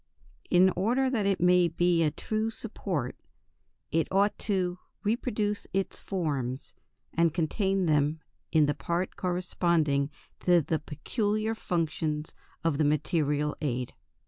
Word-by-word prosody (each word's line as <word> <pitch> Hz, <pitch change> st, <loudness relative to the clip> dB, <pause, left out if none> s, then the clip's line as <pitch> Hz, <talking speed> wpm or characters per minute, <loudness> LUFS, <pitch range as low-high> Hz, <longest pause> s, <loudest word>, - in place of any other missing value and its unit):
In 185 Hz, +1 st, +6 dB
order 245 Hz, +8 st, +2 dB
that 215 Hz, -6 st, +1 dB
it 195 Hz, -, +1 dB
may 180 Hz, 0 st, +5 dB
be 170 Hz, +1 st, +2 dB
a 155 Hz, -, +4 dB
true 215 Hz, +8 st, -2 dB
support 190 Hz, -, -4 dB, 0.8 s
it 165 Hz, +1 st, +2 dB
ought 200 Hz, +2 st, +3 dB
"to 180 Hz, -3 st, -1 dB, 0.2 s
reproduce 210 Hz, -2 st, -1 dB
its 195 Hz, 0 st, -1 dB
forms" 140 Hz, -8 st, -3 dB, 0.4 s
and 165 Hz, -1 st, +2 dB
contain 190 Hz, +3 st, +1 dB
them 150 Hz, 0 st, +2 dB, 0.3 s
in 155 Hz, -2 st, +5 dB
the 145 Hz, -, +1 dB
part 170 Hz, +6 st, -2 dB
corresponding 170 Hz, -5 st, +1 dB, 0.3 s
to 175 Hz, -1 st, +4 dB
the 160 Hz, +2 st, 0 dB
peculiar 215 Hz, -, -1 dB
functions 160 Hz, -6 st, -2 dB, 0.3 s
of 160 Hz, -3 st, +1 dB
the -, -, +4 dB
material 150 Hz, 0 st, +1 dB
aid. 125 Hz, -4 st, -2 dB
175 Hz, 125 wpm, -29 LUFS, 150-195 Hz, 0.8 s, In